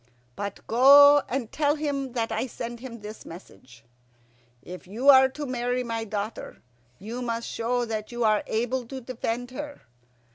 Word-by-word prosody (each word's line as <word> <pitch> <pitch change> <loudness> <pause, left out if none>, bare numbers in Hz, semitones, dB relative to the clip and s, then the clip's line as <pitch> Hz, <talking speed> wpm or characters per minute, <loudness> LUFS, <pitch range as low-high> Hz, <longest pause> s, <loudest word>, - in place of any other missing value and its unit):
"But 200 -1 -6
go 285 +4 +7
and 245 -3 -3
tell 295 -1 +1
him 280 -4 -3
that 230 -2 -2
I 220 +4 -2
send 235 0 -7
him 235 -3 -9
this 210 +1 -9
message: 130 -8 -14 0.8
'If 180 0 -10
you 235 +9 +1
are 265 -1 +8
to 295 +2 -6
marry 250 -1 -2
my 230 -1 -4
daughter, 210 +1 -6 0.3
you 225 +6 -7
must 230 -1 -3
show 240 +1 -1
that 220 -1 -5
you 240 0 -2
are 215 -1 +3
able 240 +2 -2
to 265 +2 -7
defend 245 0 -4
her. 290 +2 -7
240 Hz, 160 wpm, -26 LUFS, 220-260 Hz, 0.8 s, are